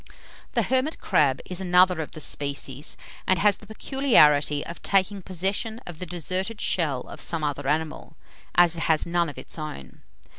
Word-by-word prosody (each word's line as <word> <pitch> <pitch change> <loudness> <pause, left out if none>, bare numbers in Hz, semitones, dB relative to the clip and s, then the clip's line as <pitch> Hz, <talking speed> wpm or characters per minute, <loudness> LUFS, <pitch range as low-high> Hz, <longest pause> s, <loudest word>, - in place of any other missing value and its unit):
The - - +2
hermit 265 +4 0
crab 140 -3 +2
is 180 0 -3
another 180 -2 +4
of 155 - -7
the - - -8
species, 140 0 -2 0.3
and 185 - +3
has 205 +3 +3
the 215 - -16
peculiarity 150 - +3
of 170 - -8
taking 195 0 +1
possession 195 +5 -2
of 170 -2 -9
the 180 - -5
deserted 185 +6 -3
shell 150 -8 0
of - - -6
some 165 -2 -1
other 145 -2 -2
animal, 160 +1 -2 0.4
as 175 -1 +5
it 165 - -3
has 160 -2 +3
none 170 -1 0
of 145 - -10
its - - -6
own. 150 - -8
170 Hz, 175 wpm, -25 LUFS, 150-190 Hz, 0.4 s, as